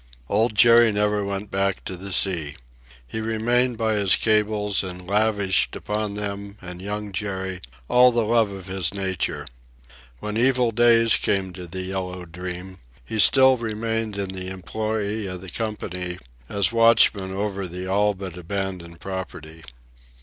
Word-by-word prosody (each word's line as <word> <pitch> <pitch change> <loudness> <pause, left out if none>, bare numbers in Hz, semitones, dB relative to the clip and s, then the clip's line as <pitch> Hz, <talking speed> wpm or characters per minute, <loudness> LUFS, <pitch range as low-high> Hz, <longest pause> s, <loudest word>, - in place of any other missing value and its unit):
Old 110 0 +2
Jerry 115 0 +7
never 105 0 +1
went 100 +1 -4
back 95 -1 -1
to 95 - -4
the 100 +2 -8
sea. 85 -6 0 0.5
He 110 - -5
remained 120 +2 +1
by 110 -1 +1
his 100 -2 +3
cables, 105 -2 +1
and 90 -1 -7
lavished 100 -1 +2
upon 105 -1 -3
them 100 0 -4
and 90 -1 -8
Young 105 +1 -4
Jerry 95 -2 -3 0.3
all 125 0 +6
the 120 -1 +1
love 115 -1 +3
of 95 -2 -8
his 95 -1 -2
nature. 95 -2 -2 0.7
When 105 +1 -4
evil 125 -1 +3
days 115 0 +5
came 95 -2 -1
to 90 -1 -8
the 95 +2 -5
Yellow 90 -1 -4
Dream, 90 +2 -7 0.3
he 110 - -4
still 130 +4 +6
remained 115 -1 -3
in 100 -1 -3
the 95 -1 -5
employ 105 +2 -3
of 90 -1 -7
the 95 -2 -8
company 90 -5 -4 0.3
as 100 0 +1
watchman 115 -4 +4
over 100 -1 -3
the 90 +1 -6
all 100 +2 +2
but 95 -2 -7
abandoned 90 -2 -5
property. 80 -4 -7
100 Hz, 150 wpm, -23 LUFS, 95-110 Hz, 0.7 s, Jerry